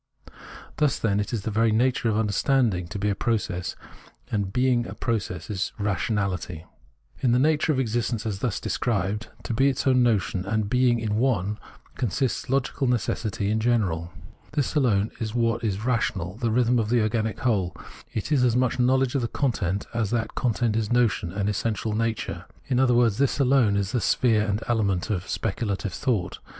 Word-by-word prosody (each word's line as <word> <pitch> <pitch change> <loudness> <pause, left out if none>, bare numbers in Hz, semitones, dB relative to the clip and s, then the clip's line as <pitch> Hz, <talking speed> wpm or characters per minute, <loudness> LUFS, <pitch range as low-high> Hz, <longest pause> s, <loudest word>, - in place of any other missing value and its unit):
Thus, 150 -3 +2
then, 100 -2 +1
it 105 - -2
is 115 -5 -2
the 110 - -2
very 110 +1 +2
nature 120 +1 +2
of 105 - +1
understanding 110 -3 +1
to 90 - -6
be 100 +1 0
a - - +2
process, 100 -5 -2 0.6
and 100 -3 -1
being 125 0 +2
a - - -7
process 95 -7 -2
it - - -4
is 95 - -2
Rationahty. 100 -4 -1 0.6
In 120 -2 +2
the - - +4
nature 155 +3 +2
of 135 - 0
existence 120 -2 -1
as 100 -3 -2
thus 115 -2 -1
described 105 -1 -1
— - - -23
to - - -3
be 135 +5 +3
its 135 - -2
own 130 -2 +4
notion 105 -6 +1
and 105 +1 -1
being 125 0 +3
in 110 -2 -1
one 105 -4 0 0.2
— - - -30
consists 125 +2 -1
logical 135 +1 0
necessity 110 -3 -1
in 110 - +1
general. 95 -8 0 0.4
This 145 -3 0
alone 115 -8 +2
is 110 0 -3
what 115 0 +1
is 105 0 -2
rational, 100 -7 -1
the 120 -1 -1
rhythm 120 +1 +3
of 110 -2 -1
the 120 -1 +3
organic 110 0 -1
whole: 95 -8 0 0.4
it 110 +7 -4
is 140 -4 +3
as 120 -2 +3
much 125 0 +1
know 125 +1 +4
ledge 130 -1 +1
of 125 -5 -1
content 100 -8 -1
as 115 -4 0
that 115 0 -1
content 120 -2 0
is 110 -1 -1
notion 115 -7 +2
and 100 +2 -2
essential 105 +1 -1
nature. 115 0 -2 0.2
In 125 -2 0
other 125 -2 +4
words, 120 -2 +3
this 140 -1 +2
alone 130 -7 +3
is 100 0 -1
the 120 -2 0
sphere 110 -3 +2
and 105 +2 -1
element 105 -4 0
of 95 -3 -3
speculative 100 -1 -2
thought. 105 -9 -1
115 Hz, 190 wpm, -25 LUFS, 100-125 Hz, 0.6 s, the